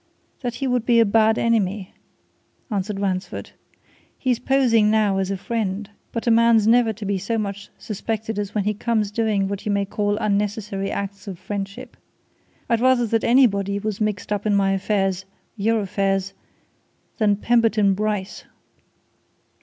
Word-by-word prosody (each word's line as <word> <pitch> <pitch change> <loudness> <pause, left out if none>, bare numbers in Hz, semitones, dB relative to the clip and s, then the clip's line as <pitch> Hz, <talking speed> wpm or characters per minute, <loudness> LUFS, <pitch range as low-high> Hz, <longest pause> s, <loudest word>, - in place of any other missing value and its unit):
"That 245 -3 -3
he 275 - -3
would 250 -3 +1
be 235 -1 +4
a 230 - +6
bad 220 +1 +3
enemy," 210 -4 0 0.8
answered 200 0 -2
Ransford. 190 -2 -3 0.7
"He's 250 -3 0
posing 245 -5 +3
now 210 -3 +2
as 190 0 -1
a 195 - -2
friend 205 -1 -3 0.2
but 230 - -4
a 235 - +3
man's 230 -1 +5
never 230 0 +4
to 215 0 -8
be 200 -1 -1
so 225 +5 -2
much 200 -1 -4
suspected 220 0 -4
as 205 0 -4
when 210 - +1
he 210 +2 0
comes 215 -1 -1
doing 210 -3 0
what 200 0 -4
you - - +1
may 200 0 +1
call 205 +1 -1
unnecessary 205 -1 -1
acts 200 0 -5
of 190 -3 -6
friendship. 200 +1 -6 0.7
I'd 230 -1 +1
rather 255 -1 +4
that 225 0 0
anybody 200 -6 +3
was 210 0 -4
mixed 210 -1 -1
up 205 +1 -2
in 205 - +3
my 195 -1 +2
affairs 195 -1 0 0.3
your 220 +1 +1
affairs 195 0 -1 0.9
than 210 -2 +3
Pemberton 220 -2 +3
Bryce!" 210 -1 -3
210 Hz, 160 wpm, -22 LUFS, 195-225 Hz, 0.9 s, a